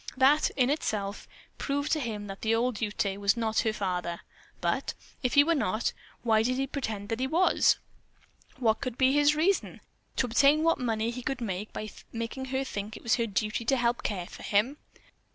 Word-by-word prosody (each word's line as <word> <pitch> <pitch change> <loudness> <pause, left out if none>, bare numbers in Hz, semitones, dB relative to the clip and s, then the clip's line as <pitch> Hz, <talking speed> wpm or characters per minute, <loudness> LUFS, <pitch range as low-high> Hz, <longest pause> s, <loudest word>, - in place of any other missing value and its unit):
That, 280 +4 +5
in 255 0 +3
itself, 205 -9 -2 0.3
proved 285 +1 -1
to 315 - +2
him 220 -6 -4
that 195 -1 -8
the 225 0 +2
old 240 -1 0
Ute 205 -2 -1
was 200 +3 +2
not 225 -1 +1
her 225 - +2
father, 180 -4 -2 0.4
but, - - -1 0.3
if 250 -2 0
he 285 - +8
were 335 +3 +2
not, 220 - 0 0.3
why 220 -2 +4
did 250 +3 +1
he 270 +1 0
pretend 220 -7 -4
that 225 0 -2
he 260 - 0
was? 340 +7 +4 0.8
What 225 -3 +1
could 250 -1 -4
be 260 0 +4
his 290 +1 +4
reason? 365 +6 +1 0.4
To - - +2
obtain 280 +6 +4
what 330 0 +3
money 225 -2 0
he 250 +1 -6
could 270 +2 -2 0.4
by 215 0 -5 0.2
making 230 +3 -4
her 265 +1 -1
think 210 -4 -5
it 235 - 0
her 235 -1 +2
duty 215 +2 -1
to 270 +3 +3
help 240 0 +1
care 185 -5 -2
for - - -11
him. 220 +8 +1
235 Hz, 190 wpm, -29 LUFS, 215-270 Hz, 0.8 s, he